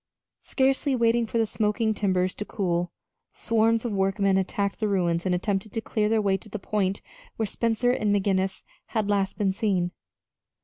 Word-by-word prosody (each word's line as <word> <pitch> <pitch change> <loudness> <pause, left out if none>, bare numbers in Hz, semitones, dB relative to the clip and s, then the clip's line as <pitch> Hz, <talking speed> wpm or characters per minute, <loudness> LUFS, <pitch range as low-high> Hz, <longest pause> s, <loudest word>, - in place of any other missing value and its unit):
Scarcely 270 +1 +1
waiting 235 -1 +2
for 230 - -2
the 225 - +3
smoking 215 +1 0
timbers 185 -3 0
to - - -5
cool, 175 -4 -1 0.4
swarms 225 +1 +1
of 235 - -1
workmen 195 0 +1
attacked 195 +1 -1
the 215 - 0
ruins 175 -3 0
and 180 - +2
attempted 195 +2 -2
to - - -1
clear 215 -1 -1
their 225 0 +3
way 195 -1 +2
to 215 +3 -15
the 215 - -4
point 200 -1 -1 0.3
where 220 - -1
Spencer 230 +3 0
and 215 -4 0
McGinnis 195 -1 0 0.2
had 215 -3 -1
last 195 -1 0
been 200 -3 +1
seen. 190 -4 0
205 Hz, 175 wpm, -26 LUFS, 190-225 Hz, 0.4 s, the